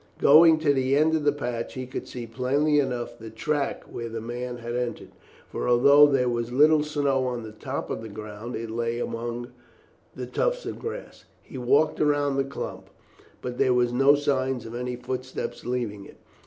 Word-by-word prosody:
Going 160 Hz, +2 st, +7 dB
to 145 Hz, -2 st, +3 dB
the 135 Hz, 0 st, +1 dB
end 155 Hz, +2 st, +3 dB
of 155 Hz, -2 st, 0 dB
the 145 Hz, -, +5 dB
patch 120 Hz, -5 st, -4 dB
he 130 Hz, 0 st, -4 dB
could 125 Hz, -, -6 dB
see 120 Hz, -2 st, -6 dB
plainly 135 Hz, +6 st, +1 dB
enough 125 Hz, -4 st, -2 dB
the 115 Hz, 0 st, -8 dB
track 140 Hz, +6 st, -2 dB
where 115 Hz, -1 st, -7 dB
the 115 Hz, 0 st, -5 dB
man 120 Hz, +2 st, -5 dB
had 120 Hz, 0 st, -6 dB
entered, 125 Hz, -1 st, -4 dB, 0.4 s
for -, -, -3 dB
although 140 Hz, +4 st, +7 dB
there 135 Hz, -3 st, +2 dB
was 120 Hz, 0 st, -2 dB
little 150 Hz, +4 st, +5 dB
snow 140 Hz, -3 st, 0 dB
on 120 Hz, -2 st, -3 dB
the 110 Hz, -, -8 dB
top 110 Hz, -, -5 dB
of -, -, -3 dB
the 110 Hz, -, -8 dB
ground 105 Hz, +3 st, -7 dB
it 115 Hz, 0 st, -5 dB
lay 115 Hz, +1 st, -2 dB
among 120 Hz, +1 st, -4 dB, 0.7 s
the -, -, -5 dB
tufts -, -, -1 dB
of -, -, -5 dB
grass. 460 Hz, +2 st, -7 dB, 0.2 s
He 130 Hz, -, -9 dB
walked 140 Hz, +5 st, +2 dB
round 145 Hz, -2 st, +2 dB
the -, -, +3 dB
clump, 135 Hz, +1 st, -7 dB, 0.5 s
but 125 Hz, 0 st, -5 dB
there 125 Hz, -1 st, +3 dB
were 125 Hz, 0 st, +4 dB
no 135 Hz, +4 st, +5 dB
signs 135 Hz, -4 st, -1 dB
of 115 Hz, -, -8 dB
any 125 Hz, +1 st, -3 dB
footsteps 130 Hz, +1 st, -5 dB
leaving 115 Hz, -5 st, -3 dB
it. -, -, -15 dB
125 Hz, 195 wpm, -26 LUFS, 120-145 Hz, 0.7 s, Going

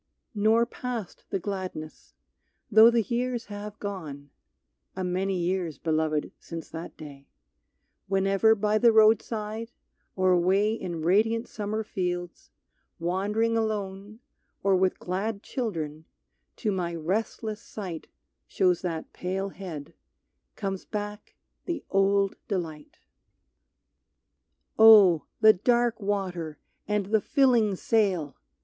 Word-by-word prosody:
Nor 220 Hz, +2 st, +3 dB
passed 240 Hz, -4 st, -6 dB
the -, -, -1 dB
gladness. 165 Hz, -, -6 dB, 0.6 s
Though 220 Hz, +2 st, +9 dB
the 235 Hz, -1 st, +2 dB
years 240 Hz, +1 st, -2 dB
have 205 Hz, +1 st, -7 dB
gone 155 Hz, -10 st, -7 dB, 0.6 s
(A 190 Hz, -, -3 dB
many 185 Hz, +1 st, -1 dB
years, 175 Hz, -3 st, -1 dB
Beloved, 155 Hz, -1 st, -1 dB
since 165 Hz, -1 st, -8 dB
that 165 Hz, +1 st, -8 dB
day,) 140 Hz, -3 st, -11 dB, 0.8 s
Whenever 195 Hz, +3 st, +3 dB
by 210 Hz, +1 st, +1 dB
the 235 Hz, 0 st, +6 dB
roadside 220 Hz, 0 st, +2 dB, 0.5 s
or 185 Hz, -1 st, +3 dB
away 190 Hz, +4 st, +3 dB
In 175 Hz, -7 st, -5 dB
radiant 225 Hz, +6 st, +2 dB
summer 215 Hz, +1 st, -3 dB
fields, 175 Hz, -3 st, -4 dB, 0.5 s
wandering 205 Hz, +7 st, 0 dB
alone 210 Hz, -1 st, -3 dB, 0.4 s
Or 195 Hz, -1 st, +4 dB
with 185 Hz, 0 st, +2 dB
glad 200 Hz, +3 st, -3 dB
children, 160 Hz, -, -4 dB, 0.5 s
to 215 Hz, -, -1 dB
my 175 Hz, -3 st, -2 dB
restless 210 Hz, +5 st, -2 dB
sight 185 Hz, -8 st, -7 dB, 0.4 s
Shows 180 Hz, -2 st, +2 dB
that 165 Hz, -3 st, -4 dB
pale 190 Hz, +2 st, -3 dB
head, 175 Hz, -7 st, -8 dB, 0.6 s
comes 195 Hz, -2 st, -4 dB
back 210 Hz, 0 st, -6 dB, 0.3 s
the 335 Hz, -5 st, -4 dB
old 195 Hz, 0 st, +3 dB
delight. 165 Hz, -7 st, -4 dB, 1.8 s
Oh! 205 Hz, -7 st, +8 dB, 0.2 s
the 220 Hz, 0 st, +8 dB
dark 240 Hz, +3 st, +1 dB
water, 185 Hz, -6 st, -3 dB, 0.3 s
and 210 Hz, -1 st, 0 dB
the 215 Hz, +2 st, +2 dB
filling 240 Hz, -8 st, +3 dB
sail! 185 Hz, -, 0 dB
195 Hz, 110 wpm, -27 LUFS, 175-220 Hz, 1.8 s, Though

